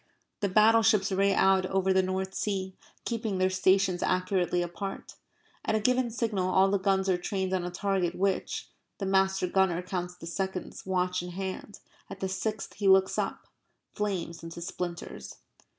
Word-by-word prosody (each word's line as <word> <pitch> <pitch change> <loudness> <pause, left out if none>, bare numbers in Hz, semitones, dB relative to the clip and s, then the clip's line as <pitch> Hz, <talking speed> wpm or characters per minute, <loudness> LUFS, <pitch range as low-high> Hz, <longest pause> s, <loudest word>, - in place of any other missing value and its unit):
The 200 -3 0
battleships 215 0 +4
ray 195 +1 +3
out 190 -1 +3
over 190 0 +1
the 190 - +4
North 190 +1 -2
Sea, 190 -2 -2 0.3
keeping 225 -4 -2
their 185 0 +2
stations 185 -1 +2
accurately 180 -1 +1
apart. 195 +3 -6 0.5
At 220 - 0
a - - +2
given 250 +2 +2
signal 215 -5 -1
all 190 +1 +4
the 200 - +2
guns 190 0 +1
are 180 -2 +2
trained 190 +1 -2
on 185 -2 0
a 175 - -3
target 180 -1 -1
which 195 0 -1 0.3
(the 195 - -3
master 190 -1 +2
gunner 180 -1 +1
counts 180 -1 -4
the - - -11
seconds, 190 +2 -4
watch 180 -1 0
in 180 - -6
hand 190 +2 -6 0.3
at 195 - -8
the 190 - -2
sixth 215 +3 -3
he 205 - 0
looks 190 0 +5
up) - - -3 0.5
flames 185 -5 -3
into 165 +1 -8
splinters. 175 0 -6
190 Hz, 165 wpm, -29 LUFS, 185-195 Hz, 0.5 s, looks